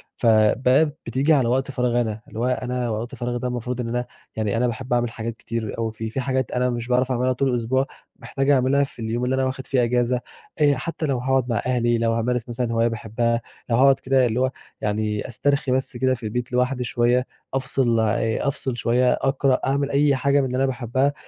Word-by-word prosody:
فبقى 125 +6 +4
بتيجي 135 +7 +2
على 135 -5 +3
وقت 130 +3 0
فراغي 120 -1 +1
أنا، 110 -2 -3
اللي 110 - -8
هو 120 - +1
أنا 125 -1 -1
وقت 115 +2 -4
فراغي 120 0 -3
ده 125 - -2
المفروض 125 0 -3
إن 115 - -4
أنا 125 +1 -1 0.3
يعني 110 0 -1
أنا 125 +2 +2
باحب 120 +2 -3
أعمل 120 -1 +1
حاجات 115 0 -5
كتير 115 -2 -4
أوي 115 -1 -1
فيه، 110 0 -5
في 130 +4 -3
حاجات 130 -1 -1
أنا 125 0 +1
مش 120 -1 -3
باعرف 125 +1 +1
أعملها 130 +1 +1
طول 135 +2 0
الأسبوع، 125 +2 +1 0.3
محتاج 135 0 -2
أعملها 140 +1 +4
في 135 - -8
اليوم 115 +2 -1
اللي 125 - 0
أنا 130 0 +1
واخد 130 0 -4
فيه 130 -3 +2
إجازة، 125 +1 +1 0.4
آآ، 145 -2 +4
حتى 160 +4 -4
لو 135 -3 0
هاقعد 130 0 0
مع 115 -3 0
أهلي، 120 -2 +2
لو 115 0 +1
هامارس 120 +1 -1
مثلًا 120 -1 -2
هواية 115 +1 +3
باحبها، 115 +1 -1 0.3
لو 115 - +3
هاقعد 135 +2 +5
كده 130 -1 +2
اللي 120 0 0
هو 130 0 +2 0.3
يعني 105 0 -1
أسترخي 140 +2 0
بس 130 -1 -1
كده 130 +1 +2
في 120 -2 -7
البيت 120 +3 -3
لوحدي 125 +1 +1
شوية، 120 +2 +1 0.3
أفصل 130 -3 +1
يع 110 +2 0
أفصل 135 -3 -2
شوية، 125 +1 +2
أقرأ، 135 -1 +1
أعمل 140 +1 0
أي 140 0 +3
حاجة 140 +2 +2
من 135 - +1
اللي 130 0 -2
أنا 135 - +2
باحبها، 130 +2 0
125 Hz, 215 wpm, -23 LUFS, 115-130 Hz, 0.4 s, هاقعد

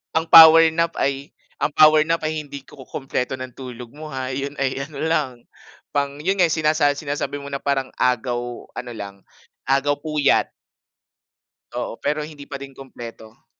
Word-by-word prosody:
Ang 160 0 0
power 160 0 +10
nap 165 +1 -1
ay 140 +1 -2 0.2
ang 150 - 0
power 155 0 +6
nap 165 -1 0
ay 155 0 -1
hindi 140 -2 -9
kukumpleto 135 -2 -5
ng 130 -1 -8
tulog 125 -2 -10
mo 155 +1 -10
ha, 130 -2 -4
yun 140 +2 -4
ay 135 -1 -2
ano 145 -3 -10
lang, 155 -5 0 0.6
pang 140 0 -2
yun 195 +2 0
nga 175 - +5
sinasa 155 -2 +2
sinasabi 145 -1 -4
mo 140 0 -7
na 140 - -3
parang 135 -2 -1
agaw 120 -1 -1
ano 120 -1 -6
lang 100 -2 -7 0.5
agaw 140 +2 +1
puyat. 150 -2 +1 1.3
Oo, - - -4
pero 150 +1 -1
hindi 150 -2 -9
pa 140 -1 -8
din 135 -1 -10
kumpleto. 115 -4 -11
140 Hz, 165 wpm, -21 LUFS, 130-155 Hz, 1.3 s, power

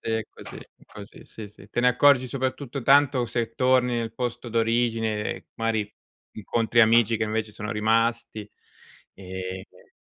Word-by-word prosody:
sì, 115 - -5
è 110 0 0
così, - - -11 0.3
così, - - -13
sì, 105 -2 -10
sì. 100 0 -18
Te 120 - -2
ne 125 - +4
accorgi, 130 0 +4
soprattutto, 130 0 -4
tanto, 135 -2 +4
se 115 -1 -3
torni 125 -1 +2
nel 115 -1 -4
posto 120 0 -4
d'origine, 115 -2 -1
mari, 110 -2 -2 0.4
incontri 115 +2 +1
amici 115 0 +4
che, 110 - -1
invece, 110 0 -3
sono 105 +2 -6
rimasti 115 0 0 0.6
e, 95 -1 -7 0.2
ehm, - - -23
115 Hz, 150 wpm, -25 LUFS, 110-125 Hz, 0.6 s, ne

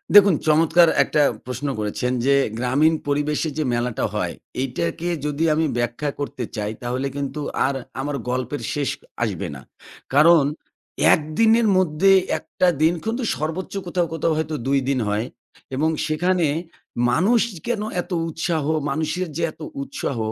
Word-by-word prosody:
দেখুন। 200 -4 +8
চমৎকার 165 +2 +5
একটা 150 - +1 0.2
প্রশ্ন 125 +3 -4
করেছেন 105 +4 -1
যে, 140 0 +5 0.2
গ্রামীণ 135 +6 +3
পরিবেশে 150 +2 0
যে 155 - +1
মেলাটা 120 -1 -1
হয়, - - -1 0.3
এটাকে 120 - -3 0.2
যদি 150 +1 -1
আমি 160 +1 +1
ব্যাখ্যা 120 +5 -1
করতে 140 -3 -4
চাই, 105 -1 -2
তাহলে 125 +2 -2
কিন্তু 140 +1 -3 0.2
আর 135 - 0 0.3
আমার 145 +1 -3
গল্পের 130 +3 -2
শেষ 145 -2 -1 0.3
আসবে 100 -7 -2
না। 65 - -10 0.5
কারণ 155 +2 +7 0.7
১ - - +2 0.2
দিনের 225 0 +5
মধ্যে 185 +1 +3 0.3
১ - - -11 0.2
টা 185 - +6
দিন 160 +2 +4
কিন্তু 235 +3 -1
সর্বোচ্চ 160 +5 -4
কোথাও, 175 -1 0
কোথাও, 165 0 0
হয়তো 155 0 -2
২ 140 0 +3
দিন 135 -2 +1
হয়। 105 +2 0 0.5
এবং 155 +4 +2 0.2
সেখানে 170 +2 +1 0.6
মানুষ 205 - +3 0.3
কেনো 225 -3 -1
এত 175 - -14 0.2
উৎসাহ? 160 -1 -1 0.3
মানুষের 160 +4 -1
যে 170 - -1
এত - - -20 0.2
উৎসাহ 270 - -4
150 Hz, 150 wpm, -22 LUFS, 130-170 Hz, 0.7 s, দেখুন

